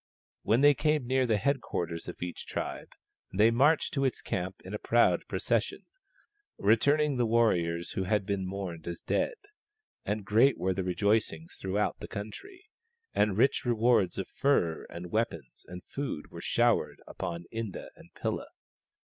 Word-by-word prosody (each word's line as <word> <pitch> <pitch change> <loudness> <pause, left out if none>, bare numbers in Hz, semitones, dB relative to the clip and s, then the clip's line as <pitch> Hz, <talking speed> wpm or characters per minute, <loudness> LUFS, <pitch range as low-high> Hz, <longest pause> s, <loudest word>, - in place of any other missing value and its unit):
When 115 +4 +2
they 145 0 +7
came 150 -1 +1
near 130 +1 +2
the 110 -2 +3
head 140 +4 +1
quarters 85 -1 -4
of - - -6
each 90 -1 -6
tribe - - -5 0.4
they 105 +4 +4
marched 145 +7 +3
to 135 - 0
its 130 -3 0
camp 95 +1 -3
in 95 - -7
a 105 - -3
proud 120 0 +3
procession, - - -1 0.7
returning 140 +7 +3
the 120 -1 +2
warriors 85 -8 +1
who 95 -2 -2
had 105 0 +1
been 100 -1 -1
mourned 90 -4 -5
as 85 -1 -5
dead: - - 0 0.7
and 105 0 -2
great 115 +8 +4
were 95 +1 0
tlie 95 0 -3
rejoicings 110 - 0
throughout 100 +2 -1
the - - -7
country, 360 - -8 0.5
and 105 -2 +2
rich 130 +4 +3
rewards 115 -6 +2
of 95 - -3
furs 85 - +1
and 85 +1 -8
weapons 85 - -2
and 90 0 -8
food 135 - -5
were - - -8
showered - - +1
upon 85 0 -5
Inda 115 -4 -5
and - - -17
Pilla. - - -3
105 Hz, 160 wpm, -30 LUFS, 90-130 Hz, 0.7 s, they